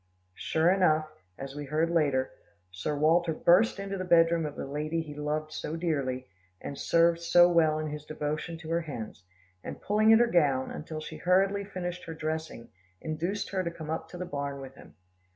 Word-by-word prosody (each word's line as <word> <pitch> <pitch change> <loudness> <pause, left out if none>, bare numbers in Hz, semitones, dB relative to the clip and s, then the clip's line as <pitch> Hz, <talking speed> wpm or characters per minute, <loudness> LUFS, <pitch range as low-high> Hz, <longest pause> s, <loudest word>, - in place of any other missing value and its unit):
Sure 160 - +1
enough, 155 -5 +3 0.3
as 135 0 -7
we 145 0 -6
heard 155 +4 0
later, 140 -6 +1 0.4
Sir 95 +11 -3
Walter 165 +3 +3
burst 180 +9 +4
into 195 -1 -4
the - - -2
bed 165 -2 +5
room 165 -2 0
of 145 - -8
the - - -5
lady 150 +4 -2
he 150 -2 -9
loved 150 +1 -3
so 155 - -4
dearly, 140 -7 -2 0.3
and 140 - -6
served 170 +3 +3
so 175 +1 +6
well 160 -2 +3
in 155 - -3
his 150 0 -6
devotion 155 +2 -4
to 160 -1 -10
her 170 +1 +1
hens, 120 - -7 0.4
and - - -7
pulling 215 +2 +3
at 225 - +8
her 240 - +5
gown, 145 - +2
until 155 0 -6
she 155 0 -8
hurriedly 195 +4 +2
finished 180 -3 -5
her 165 - -7
dressing, 155 -6 -4 0.3
induced 170 +6 -3
her 190 -2 -1
to 170 - -2
come 160 -2 -7
up 160 - -4
to 180 - -9
the 180 - -4
barn 140 -4 -4
with 135 -1 -9
him. - - -16
160 Hz, 200 wpm, -29 LUFS, 150-175 Hz, 0.4 s, at